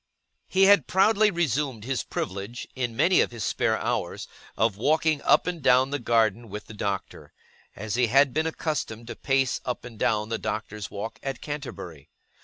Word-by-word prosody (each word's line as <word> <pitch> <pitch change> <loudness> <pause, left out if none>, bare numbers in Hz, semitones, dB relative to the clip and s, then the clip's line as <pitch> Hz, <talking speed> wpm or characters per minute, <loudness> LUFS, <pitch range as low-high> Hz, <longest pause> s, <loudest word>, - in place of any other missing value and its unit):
He 190 +1 +3
had 195 -7 +6
proudly 210 +3 +4
resumed 145 - -1
his 130 +2 -1
privilege, 100 +6 -5
in 120 -3 -2
many 180 +9 +4
of - - +1
his 115 -4 -6
spare - - +1
hours, - - -3 0.3
of 110 -2 +2
walking 155 +6 +1
up - - +4
and 175 -2 -3
down 130 +1 +4
the 145 - -1
garden 115 -1 +1
with 105 +2 -7
the 110 - -11
Doctor; 100 -2 -4 0.4
as 110 +1 -5
he 125 0 +2
had 135 +2 +4
been 155 +1 +1
accustomed 150 -8 -3
to 120 - -7
pace 135 -2 0
up 125 -1 -4
and 115 -3 -11
down 105 0 +1
The 115 - -2
Doctor's 105 -2 -4
Walk 105 +3 -6
at 135 -1 -4
Canterbury. 90 - -7
125 Hz, 180 wpm, -26 LUFS, 110-150 Hz, 0.4 s, had